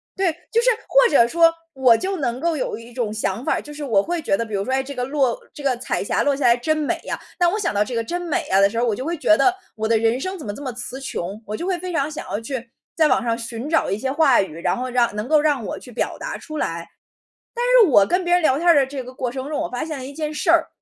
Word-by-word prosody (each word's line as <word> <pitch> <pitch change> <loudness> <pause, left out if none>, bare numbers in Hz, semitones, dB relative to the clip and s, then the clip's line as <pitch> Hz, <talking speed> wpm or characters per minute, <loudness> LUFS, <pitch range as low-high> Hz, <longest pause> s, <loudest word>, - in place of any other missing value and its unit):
对， 375 -4 +1 0.2
就 465 0 +3
是 - - +3 0.2
或 - - +5
者 235 -5 +5
说， 330 +1 +5 0.2
我 255 -3 +5
就 380 0 -2
能 250 -3 -2
够 335 -2 0
有 235 - -3
一 230 +1 -12
种 230 -3 -3
想 220 +1 -2
法 - - +2
儿， - - -1
就 295 - -11
是 295 -1 -6
我 205 -6 +2
会 345 0 -2
觉 195 - +1
得 230 - -2
比 220 - -10
如 195 0 -1
说， 260 - -2
诶， 265 0 +1
这 280 +1 -7
个 250 -1 -2
落 270 -3 0
这 290 - -10
个 260 -3 +1
彩 245 - -2
霞 - - 0
落 285 -1 +2
下 280 - -4
来 240 0 +5
真 310 +6 0
美 300 - -1
呀， - - -3 0.2
但 350 -1 +4
我 415 - -1
想 415 - -1
到 205 +1 +2
这 250 - -5
个 230 - 0
“真 350 +9 -3
美 335 -4 -2
呀” 195 - +4
的 200 0 +5
时 230 - -6
候， 240 - +2
我 225 - +1
就 255 +6 -4
会 335 0 -2
觉 230 -7 +4
得 360 +7 +3 0.2
我 220 0 -2
的 225 -1 +3
人 230 +3 +1
生 375 +5 -4
怎 305 - -9
么 205 - -4
这 285 - -9
么 260 -4 -4
词 250 +2 -7
穷， 205 -5 -5
我 210 +1 -4
就 345 - -4
会 370 -2 0
非 365 0 -5
常 300 -1 0
想 - - -7
要 - - -2
去 245 -1 -5 0.3
在 315 -2 +5
网 255 -2 +2
上 230 -1 0
寻 235 +4 -6
找 325 - +2
一 200 - -1
些 265 +4 -2
话 285 -6 +4
语， 165 -4 -6
然 - - +1
后 255 +1 -3
让 235 -3 +1
能 210 +2 -3
够 305 0 +4
让 290 -7 +1
我 - - -5
去 250 - -13
表 - - -2
达 - - -4
出 310 -1 -8
来。 170 - -3 0.7
但 480 - -1 0.2
是 - - 0
我 200 -4 +6
跟 360 0 0
别 350 - +2
人 355 - +4
聊 275 -3 +3
天 345 +3 -2
儿 340 - +7
的 275 -2 +4
这 270 0 -6
个 255 +1 -10
过 250 -2 -3
程 265 +1 -5
中， 300 - -2
我 - - -3
发 245 +4 -3
现 310 -3 -5
了 260 - -7
一 275 - -7
件 305 0 -4
事 - - +1
儿， - - +4
265 Hz, 340 characters per minute, -22 LUFS, 230-310 Hz, 0.7 s, 儿